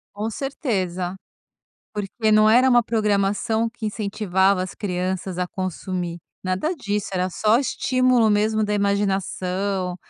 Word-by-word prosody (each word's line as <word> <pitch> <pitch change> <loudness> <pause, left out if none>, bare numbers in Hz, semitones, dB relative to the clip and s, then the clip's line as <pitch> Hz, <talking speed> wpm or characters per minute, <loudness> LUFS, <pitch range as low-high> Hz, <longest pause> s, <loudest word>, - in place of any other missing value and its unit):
Com 215 +2 -2
certeza, 190 - -2 0.8
porque 210 +2 -1
não 215 0 +6
era 245 +4 +6
uma 245 -1 +6
programação 215 +1 +1
que 230 -1 -7
incentivava 200 -3 +1
as 185 - -7
crianças 185 -1 -3
a 180 0 -1
consumir. 185 -2 -4 0.3
Nada 185 - -1
disso, 210 - -3
era 185 0 0
só 215 +5 +2
estímulo 255 -3 +2
mesmo 215 +1 +2
da 210 0 -1
imaginação, 195 -2 -1
205 Hz, 125 wpm, -23 LUFS, 185-220 Hz, 0.8 s, não